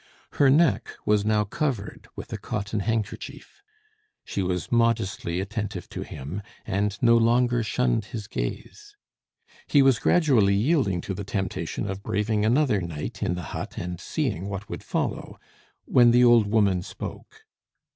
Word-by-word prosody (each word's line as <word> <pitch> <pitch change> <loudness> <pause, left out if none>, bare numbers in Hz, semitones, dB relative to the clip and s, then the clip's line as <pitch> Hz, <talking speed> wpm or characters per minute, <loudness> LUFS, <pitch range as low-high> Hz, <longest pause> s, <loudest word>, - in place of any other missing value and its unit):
Her 140 - +4
neck 135 -7 +3 0.2
was 105 -1 +3
now 105 -1 +2
covered 115 -1 -3
with - - -8
a - - -2
cotton 105 0 -3
handkerchief. 115 - -4 0.6
She 100 - -3
was 90 -1 -2
modestly 115 -7 +1
attentive 105 +1 -4
to - - -6
him, 75 +10 -6 0.2
and 100 +1 -1
no 115 -1 +6
longer 120 +1 +3
shunned 120 -1 0
his 110 -1 -6
gaze. 415 - -6 0.7
He 140 -2 +5
was 135 -4 +4
gradually 125 - +3
yielding 105 - +1
to 95 - -4
the 100 +2 -5
temptation 95 -1 -3
of 95 0 -4
braving 105 +1 0
another 120 -2 +2
night 85 -4 -6
in 90 - 0
the 90 - -5
hut, - - -6
and 90 0 -4
seeing 105 - -2
what 100 +1 -5
would - - -5
follow, - - -3 0.5
when 120 -1 +5
the 120 +1 +5
old 120 -3 +6
woman 100 -4 +2
spoke. - - -9
105 Hz, 150 wpm, -25 LUFS, 100-120 Hz, 0.7 s, no